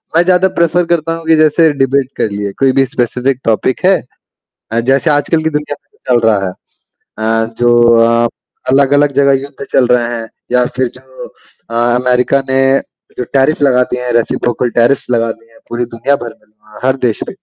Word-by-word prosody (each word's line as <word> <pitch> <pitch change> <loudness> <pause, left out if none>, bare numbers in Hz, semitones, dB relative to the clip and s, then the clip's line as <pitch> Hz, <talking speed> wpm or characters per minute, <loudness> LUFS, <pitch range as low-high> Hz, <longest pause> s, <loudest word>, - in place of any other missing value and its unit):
मैं 170 - +5
ज़्यादा 185 +1 +3
प्रेफ़र 170 +1 +2
करता 165 -1 -1
हूँ 165 0 -10
कि 160 - +5
जैसे 155 +1 +3
डिबेट 135 0 +1
कर - - 0
लिए, 100 0 -4
कोई 135 -1 +3
भी 135 - +4
स्पेसिफ़िक 125 0 -1
टॉपिक 115 - 0
है 195 - +5 0.8
अ, 115 - +1
जैसे 135 +2 +1
आजकल 155 +2 +1
की 160 - +1
दुनिया 150 -1 -3
में - - -46
जो 125 - -2
चल 115 - 0
रहा 100 -3 +1
है। - - -3 0.7
अ, 115 0 0
जो 120 0 +3 0.3
अ, 115 0 +2 0.4
अलग-अलग 140 +2 +3
जगह 140 0 +3
युद्ध 140 0 -9
चल 125 - +3
रहे 125 -1 +2
हैं 115 -1 -7 0.2
या 125 0 +3
फिर 130 -1 0
जो 130 0 -12 0.4
अ, 115 - -6
अमेरिका 125 +3 +1
ने 130 - +2 0.6
जो 125 - -1
टैरिफ 140 +3 +2
लगा 125 -3 +4
दिए 125 - -2
हैं 125 - -2
रेसिप्रोकल 120 +1 0
टैरिफ 120 +3 +2
लगा 115 -1 +1
दिए 115 0 -22
हैं, 115 - -20
पूरी 120 +1 -2
दुनिया 140 +5 0
भर 115 - -8
में 105 - -32 0.3
अ, - - -3
हर 130 0 +2
देश 110 - -3
भी। - - -8
130 Hz, 200 wpm, -13 LUFS, 120-145 Hz, 0.8 s, मैं